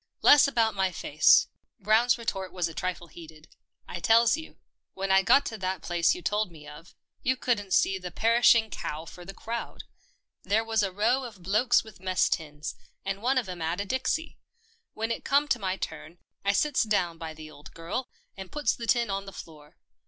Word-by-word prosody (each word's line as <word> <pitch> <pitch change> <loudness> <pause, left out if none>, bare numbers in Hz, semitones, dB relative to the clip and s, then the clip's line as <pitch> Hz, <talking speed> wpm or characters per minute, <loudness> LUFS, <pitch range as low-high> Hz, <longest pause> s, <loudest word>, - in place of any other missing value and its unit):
11 - - +9
Less 290 0 +6
about 230 -4 +1
my 190 -1 0
face." 155 -3 +4 0.3
Brown's 230 +4 +3
retort 195 -6 -4
was 180 -2 -1
a 165 - -9
trifle 175 +2 -4
heated. 160 -1 -14 0.2
" - - -47
I 175 - -6
tells 230 +6 +4
you, 320 +1 -10 0.4
when 195 0 -2
I 190 0 +6
got 260 +8 +4
to 225 -2 -5
that 185 0 -1
there 190 - -12
place 170 +1 +1
you 180 - -9
told 210 +2 0
me 150 -2 -14
of 165 +4 -13
— - - -51
you 260 +1 0
couldn't 205 -7 -1
see 190 0 +2
the 180 -1 -6
perishing 230 +2 +4
cow 155 +2 -5
for 175 +2 -11
the 195 - -9
crowd. 235 +1 -6 0.6
There 210 +4 +1
was 225 -1 0
a 195 -2 -1
row 230 +7 +1
of 215 -7 -10
blokes 215 +6 +3
with 220 -4 -14
mess 185 -1 +1
tins, 150 -2 -4 0.3
and 195 +1 -3
one 260 +3 +1
of 245 -6 0
'em 180 -2 -7
'ad 165 +3 -2
a 200 - -2
dixie. 260 +8 -2 0.6
When 225 +1 -2
it - - -3
come 285 +2 +2
to 245 - +1
my 190 -2 -2
turn, 165 -2 -7 0.3
I 200 0 +2
sits 295 +6 +2
down 180 -7 0
by 160 -2 -7
the 155 0 -11
old 150 +1 -14
girl, 175 +10 -4 0.3
and 190 -1 -9
puts 295 -6 0
the 230 - -7
tin 235 -4 +2
on 195 0 -3
the 195 - -9
floor. 150 -5 -13
195 Hz, 215 wpm, -27 LUFS, 175-230 Hz, 0.6 s, 11